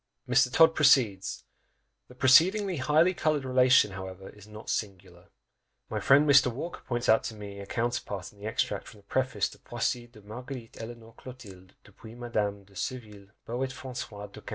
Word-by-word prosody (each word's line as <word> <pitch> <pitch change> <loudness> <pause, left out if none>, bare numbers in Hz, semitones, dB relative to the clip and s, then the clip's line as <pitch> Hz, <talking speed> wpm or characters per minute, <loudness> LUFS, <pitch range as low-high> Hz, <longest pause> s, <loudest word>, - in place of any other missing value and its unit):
Mr. 125 0 +3
Todd 160 +3 +6
proceeds, 120 -11 +3 0.6
"The 125 - -16
preceding 180 +10 +4
highly 155 +6 +3
coloured 155 -5 0
relation, 130 -4 +4
however, 95 0 -8
is 105 0 -16
not 105 +1 -12
singular; 95 -4 -5 0.7
my - - -1
friend, 145 +3 +5
Mr. 135 -3 +6
Walker, 165 +9 -6
points 120 0 -2
out 110 - +4
to 115 - -5
me 100 -1 -9
a 100 - -9
counterpart 115 -5 -3
in 100 - -22
the 105 - -6
extract 110 - -2
from 105 - -14
the - - -36
preface 130 +4 0
to - - -16
_Poésies 120 0 -3
de 105 - -15
Marguerite 120 +3 -9
Eleanore 115 0 -10
Clotilde, 100 -8 -13
depuis 115 0 -14
Madame 105 -4 -2
de 100 0 -23
Surville, 105 -3 -6 0.2
Poète 130 +3 -3
François 120 -6 -7
du - - -12
XV. - - -31
120 Hz, 175 wpm, -28 LUFS, 100-130 Hz, 0.7 s, Todd